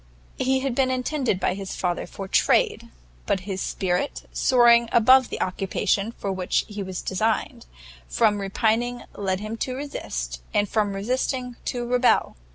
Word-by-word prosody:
He 265 Hz, 0 st, +1 dB
had 270 Hz, -2 st, -1 dB
been 260 Hz, +1 st, +2 dB
intended 255 Hz, -4 st, -1 dB
by 180 Hz, -, +1 dB
his 195 Hz, 0 st, -6 dB
father 175 Hz, -1 st, -2 dB
for 195 Hz, -, -7 dB
trade, -, -, +2 dB, 0.4 s
but 190 Hz, -, +1 dB
his 190 Hz, 0 st, -4 dB
spirit, 180 Hz, +8 st, -2 dB
soaring 235 Hz, -2 st, +5 dB
above 255 Hz, +2 st, +5 dB
the -, -, -5 dB
occupation 195 Hz, +3 st, -1 dB
for 200 Hz, -, -4 dB
which 185 Hz, -1 st, 0 dB
he 210 Hz, -1 st, -6 dB
was 185 Hz, -2 st, -5 dB
designed, 215 Hz, -, -1 dB, 0.4 s
from 200 Hz, -, +2 dB
repining 225 Hz, +5 st, 0 dB
led 190 Hz, -1 st, -2 dB
him 215 Hz, +2 st, -5 dB
to 255 Hz, +2 st, -3 dB
resist, -, -, -5 dB
and 205 Hz, -, +3 dB
from 205 Hz, -1 st, 0 dB
resisting, 250 Hz, +4 st, -2 dB
to 245 Hz, -1 st, -2 dB
rebel. 250 Hz, +1 st, +2 dB
215 Hz, 155 wpm, -24 LUFS, 190-250 Hz, 0.4 s, soaring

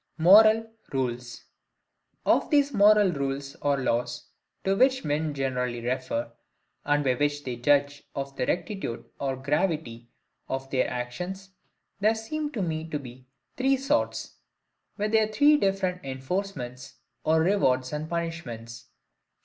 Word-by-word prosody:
Moral 215 Hz, +6 st, +7 dB, 0.3 s
Rules. 125 Hz, -2 st, -3 dB, 0.8 s
Of -, -, +3 dB
these 285 Hz, -2 st, +3 dB
moral 205 Hz, -2 st, +6 dB
rules 140 Hz, -1 st, -3 dB
or 145 Hz, -1 st, +2 dB
laws, 120 Hz, -2 st, -2 dB, 0.3 s
to 195 Hz, 0 st, +2 dB
which 260 Hz, +1 st, +3 dB
men 150 Hz, 0 st, -1 dB
generally 125 Hz, -3 st, -1 dB
refer, 120 Hz, -1 st, -2 dB, 0.5 s
and 145 Hz, 0 st, +2 dB
by 130 Hz, -2 st, +2 dB
which 145 Hz, +2 st, -1 dB
they 125 Hz, -3 st, -4 dB
judge 145 Hz, +3 st, +2 dB
of 140 Hz, 0 st, -4 dB
the 125 Hz, -, -2 dB
rectitude 175 Hz, -, -3 dB
or 135 Hz, -1 st, -1 dB
gravity 135 Hz, -4 st, -2 dB, 0.4 s
of 135 Hz, 0 st, -3 dB
their 130 Hz, -1 st, +1 dB
actions, 180 Hz, +11 st, -5 dB, 0.5 s
there 215 Hz, +2 st, +3 dB
seem 295 Hz, +7 st, -4 dB
to 215 Hz, -6 st, -1 dB
me 160 Hz, -1 st, -3 dB
to 150 Hz, -, -2 dB
be 130 Hz, -2 st, -11 dB, 0.3 s
THREE 270 Hz, +1 st, +3 dB
SORTS, 275 Hz, +3 st, -1 dB, 0.6 s
with 210 Hz, 0 st, -1 dB
their 220 Hz, -1 st, +4 dB
three 285 Hz, +8 st, +5 dB
different 195 Hz, -7 st, 0 dB
enforcements, 135 Hz, -2 st, -4 dB, 0.3 s
or 160 Hz, 0 st, +3 dB
rewards 130 Hz, -8 st, +2 dB
and 150 Hz, +1 st, -4 dB
punishments. 140 Hz, -9 st, -5 dB
145 Hz, 135 wpm, -27 LUFS, 130-195 Hz, 0.8 s, Moral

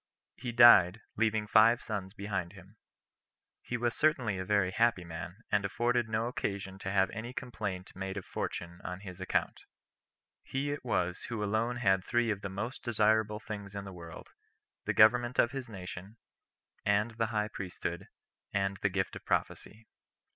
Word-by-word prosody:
He 120 Hz, -, -5 dB
died, 110 Hz, -4 st, +8 dB
leaving 110 Hz, -1 st, +1 dB
five 110 Hz, +3 st, +5 dB
sons 100 Hz, -2 st, -4 dB
behind 95 Hz, -4 st, -3 dB
him. 95 Hz, +1 st, -15 dB, 0.9 s
He 120 Hz, -, -3 dB
was 120 Hz, 0 st, 0 dB
certainly 125 Hz, -10 st, +2 dB
a -, -, -2 dB
very 100 Hz, -2 st, +2 dB
happy 115 Hz, -2 st, +2 dB
man, 85 Hz, +4 st, -8 dB
and 105 Hz, -1 st, +3 dB
afforded 120 Hz, +3 st, 0 dB
no 110 Hz, +1 st, 0 dB
occasion 100 Hz, -5 st, -3 dB
to 95 Hz, -, -4 dB
have 95 Hz, -1 st, +3 dB
any 115 Hz, +2 st, -6 dB
complaint 105 Hz, -8 st, -5 dB
made 95 Hz, +1 st, -4 dB
of 95 Hz, -, -5 dB
fortune 85 Hz, 0 st, -5 dB
on 90 Hz, +2 st, -5 dB
his 95 Hz, -2 st, -9 dB
account. 95 Hz, -, 0 dB, 0.8 s
He 140 Hz, +2 st, -2 dB
it 145 Hz, -, -4 dB
was 90 Hz, -7 st, -1 dB
who 110 Hz, -3 st, -3 dB
alone 110 Hz, +4 st, 0 dB
had 95 Hz, -6 st, +2 dB
three 120 Hz, +1 st, +1 dB
of 100 Hz, -2 st, -3 dB
the 100 Hz, -, -4 dB
most 110 Hz, +7 st, -5 dB
desirable 110 Hz, -2 st, +2 dB
things 105 Hz, -2 st, -7 dB
in 100 Hz, -, -4 dB
the 95 Hz, -, -8 dB
world, 85 Hz, -2 st, -10 dB, 0.6 s
the -, -, 0 dB
government 120 Hz, +2 st, +5 dB
of 120 Hz, -, +4 dB
his 130 Hz, -2 st, -5 dB
nation, 95 Hz, +1 st, -8 dB, 0.7 s
and 105 Hz, +3 st, +2 dB
the 115 Hz, -, +2 dB
high 105 Hz, -1 st, -1 dB
priesthood, 90 Hz, -3 st, -5 dB, 0.4 s
and 100 Hz, 0 st, 0 dB
the 105 Hz, -, +2 dB
gift 95 Hz, 0 st, -2 dB
of -, -, -8 dB
prophecy. 110 Hz, +1 st, -2 dB
105 Hz, 170 wpm, -31 LUFS, 95-115 Hz, 0.9 s, died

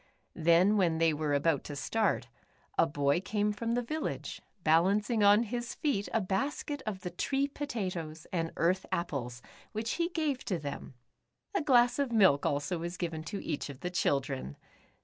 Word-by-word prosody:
Then, 170 Hz, +6 st, +4 dB
when 170 Hz, -5 st, +2 dB
they 165 Hz, -1 st, +3 dB
w^ere 150 Hz, -1 st, 0 dB
about 145 Hz, 0 st, +2 dB
to 145 Hz, -, -6 dB
start, 220 Hz, +10 st, 0 dB, 0.5 s
a 165 Hz, -, +4 dB
boy 145 Hz, +2 st, +1 dB
came 210 Hz, +1 st, 0 dB
from 230 Hz, +2 st, -2 dB
the 245 Hz, -, 0 dB
village, 310 Hz, +7 st, -4 dB, 0.2 s
balancing 200 Hz, +8 st, +3 dB
on 205 Hz, +2 st, +6 dB
his 240 Hz, +1 st, -4 dB
feet 225 Hz, -10 st, -1 dB
a 225 Hz, -, +2 dB
basket 275 Hz, +8 st, -2 dB
of 195 Hz, -3 st, -3 dB
the 180 Hz, -, -5 dB
tree 270 Hz, +10 st, 0 dB
potatoes, 185 Hz, -, -4 dB
and 165 Hz, -2 st, -1 dB
earth 185 Hz, +3 st, +1 dB
apples, 125 Hz, -7 st, -3 dB, 0.3 s
w^hich 220 Hz, +1 st, -2 dB
he 340 Hz, 0 st, +1 dB
gave 310 Hz, -6 st, -1 dB
to 185 Hz, -, 0 dB
them. 140 Hz, -3 st, -6 dB, 0.6 s
A 390 Hz, -, +1 dB
glass 245 Hz, -3 st, +4 dB
of 275 Hz, -3 st, 0 dB
milk 190 Hz, -11 st, +5 dB
also 145 Hz, +5 st, -1 dB
was 170 Hz, +2 st, -5 dB
given 165 Hz, -3 st, -3 dB
to 200 Hz, +4 st, -5 dB
each 150 Hz, -2 st, -3 dB
of 140 Hz, -1 st, -9 dB
the 180 Hz, -, -3 dB
children. 135 Hz, -, -1 dB
185 Hz, 170 wpm, -31 LUFS, 160-230 Hz, 0.6 s, on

